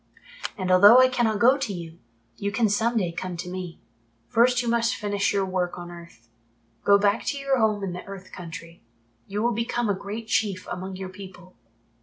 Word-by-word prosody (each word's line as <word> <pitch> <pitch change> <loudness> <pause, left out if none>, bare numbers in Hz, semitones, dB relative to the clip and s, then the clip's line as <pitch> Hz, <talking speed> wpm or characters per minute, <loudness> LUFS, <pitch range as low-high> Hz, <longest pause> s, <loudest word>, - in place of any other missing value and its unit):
And 185 -2 -1
although 200 +6 +8
I 255 0 +6
cannot 240 -4 +1
go 255 +6 +4
to 270 -6 -2
you, 170 -2 -8 0.4
you 200 0 -3
can 215 +1 +2
some 230 +3 +1
day 180 -5 0
come 180 +1 -5
to 175 +1 -6
me. 180 -2 -6 0.5
First 245 +1 +3
you - - -4
must 230 0 +1
finish 205 -1 -1
your 200 -1 +1
work 185 -2 -2
on 175 0 -8
earth. 170 -9 -13 0.6
Go 200 0 +6
back 200 +1 +1
to 280 - -1
your 275 -1 0
home 215 -2 +1
in 185 -2 -3
the 180 - -7
Earth 195 -1 -10
Country. 170 -1 -9 0.5
You 205 +2 -3
will 240 0 +2
become 235 0 -1
a - - +3
great 200 +4 -6
Chief 205 -3 -1
among 185 +2 -5
your 190 0 -6
people. 185 -1 -12
200 Hz, 200 wpm, -25 LUFS, 185-230 Hz, 0.6 s, although